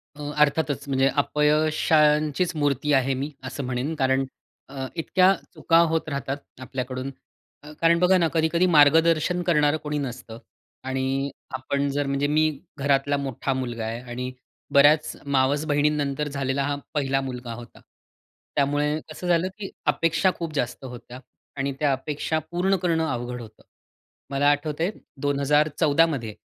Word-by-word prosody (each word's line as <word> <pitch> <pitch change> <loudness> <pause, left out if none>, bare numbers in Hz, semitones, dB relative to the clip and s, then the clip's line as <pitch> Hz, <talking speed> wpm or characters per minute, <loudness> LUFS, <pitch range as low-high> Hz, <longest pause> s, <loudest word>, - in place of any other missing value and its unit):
अ, 150 - -10 0.2
अर्थातच 145 -1 +1
म्हणजे 135 0 +2
अपयशांचीच 150 +2 +2
मूर्ती 145 0 0
आहे 135 0 +3
मी 140 +3 -3
असं 135 +2 -5
म्हणेन. 130 +5 -2
कारण 135 -1 +1 0.4
अ, 135 -1 -5
इतक्या 185 +3 +3 0.2
चुका 165 +1 +2
होत 160 0 -1
राहतात 140 -1 -3 0.2
आपल्याकडून. 130 +1 -4 0.5
अ, 150 - -10
कारण 170 0 +4
बघा 180 +1 +5
ना 170 -2 +3
कधी-कधी 165 +2 +2
मार्गदर्शन 165 +4 +4
करणारं 150 -3 +3
कोणी 150 0 -2
नसतं. 125 -4 -6 0.5
आणि 135 +1 -1 0.2
आपण 140 +2 -1
जर 145 +1 -1
म्हणजे 140 +1 0
मी 155 +1 +3 0.3
घरातला 140 0 +1
मोठा 135 -1 -2
मुलगा 120 -3 -3
आहे. 115 +2 -4
आणि 125 +1 -5 0.4
बऱ्याच 145 +2 +5
मावस 140 +2 +1
बहिणींनंतर 145 -1 0
झालेला 140 -1 -1
हा 145 - -1 0.2
पहिला 135 -2 0
मुलगा 125 -3 -6
होता. 120 +1 -11 0.8
त्यामुळे 145 +2 +1
कसं 175 +3 -6
झालं 175 +1 +2
की 200 -2 -6 0.2
अपेक्षा 165 +3 +2
खूप 165 -2 -5
जास्त 130 -2 -3
होत्या. 125 0 -9 0.4
आणि 135 0 -1
त्या 145 -2 +2
अपेक्षा 150 +3 -2
पूर्ण 185 +3 +2
करणं 165 -3 0
अवघड 125 -2 -4
होतं. 110 -1 -13 0.7
मला 140 +1 +2
आठवतं 150 +2 -1
आहे 190 - +1 0.3
2014 145 +2 +3
मध्ये 120 -9 -4
145 Hz, 145 wpm, -24 LUFS, 135-155 Hz, 0.8 s, बघा